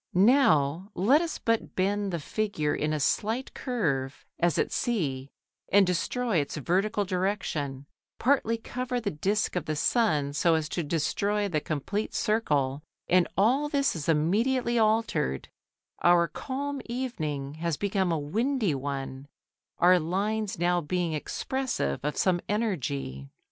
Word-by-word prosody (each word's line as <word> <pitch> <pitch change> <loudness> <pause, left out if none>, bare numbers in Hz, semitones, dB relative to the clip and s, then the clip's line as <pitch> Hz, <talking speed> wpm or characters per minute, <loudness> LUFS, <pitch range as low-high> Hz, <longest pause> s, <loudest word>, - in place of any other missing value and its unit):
Now 185 - +4
let 250 - +4
us 335 -2 -3
but 230 -1 -1
bend 200 +1 0
the 170 - -1
figure 175 -3 -1
in 150 +1 -1
a 155 - -1
slight 220 - 0
curve, 145 - -2
as 175 -1 +2
at - - +1
C, 140 - -1 0.4
and 200 0 +6
destroy 205 +4 0
its 145 -1 -1
vertical 200 - 0
direction, 180 -8 -2 0.3
partly 235 -3 +2
cover 250 +2 -3
the 210 -4 -2
disc 200 +8 0
of 180 - -1
the 155 - -2
sun 150 - +1
so 165 +3 +3
as 160 -1 -1
to 175 - -2
destroy 200 +7 0
the 155 -6 -1
complete 165 +9 -3
circle, 145 -11 +1 0.3
and 180 -1 +4
all 260 +9 +3
this 280 -5 +1
is 160 0 -4
immediately 230 +10 +2
altered, 215 - +1 0.5
our 175 -1 +5
calm 280 - -4
evening 155 - -3
has 170 -3 -1
become 195 -3 0
a 165 - +1
windy 215 - 0
one, 135 0 -4 0.5
our 180 +1 +5
lines 200 +5 -1
now 175 +1 +2
being 170 +1 -1
expressive 235 - -2
of 150 +1 -3
some 180 -2 +2
energy. 140 - -2
185 Hz, 140 wpm, -28 LUFS, 150-225 Hz, 0.5 s, and